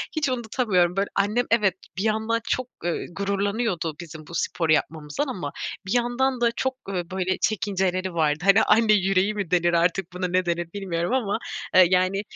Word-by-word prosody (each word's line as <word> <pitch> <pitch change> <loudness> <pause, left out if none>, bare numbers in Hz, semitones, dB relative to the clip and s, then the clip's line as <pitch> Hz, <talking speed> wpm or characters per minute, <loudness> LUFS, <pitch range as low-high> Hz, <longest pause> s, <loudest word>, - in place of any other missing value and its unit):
hiç 305 -3 +1
unutamıyorum, 220 -7 +1
böyle, 195 +1 +1
annem 210 +5 +1
evet 210 -5 +3 0.2
bir 190 - -1
yandan 220 +1 0
çok, 255 -1 0 0.2
ııı, 175 - -1
gururlanıyordu 200 -4 -1
bizim 160 -3 -10
bu 170 - -8
sporu 165 -1 0
yapmamızdan 155 - -1
ama 180 - -4 0.3
bir 190 - -2
yandan 245 +1 +1
da 235 -1 +3
çok, 260 +2 -2
ııı, 175 -3 -3
böyle, 185 0 -1
çekinceleri 190 -3 -1
vardı, 155 -2 +1
hani, 200 +3 +6
anne 215 0 +4
yüreği 195 0 +2
mi 200 -5 -4
denir 175 -1 +3
artık 175 +1 +1
buna 180 0 -2
ne 180 +1 +1
denir 170 -1 -2
bilmiyorum 180 -1 -2
ama, 220 -6 0 0.4
eee, 185 - +9
yani, 185 +2 +2
195 Hz, 175 wpm, -24 LUFS, 175-220 Hz, 0.4 s, eee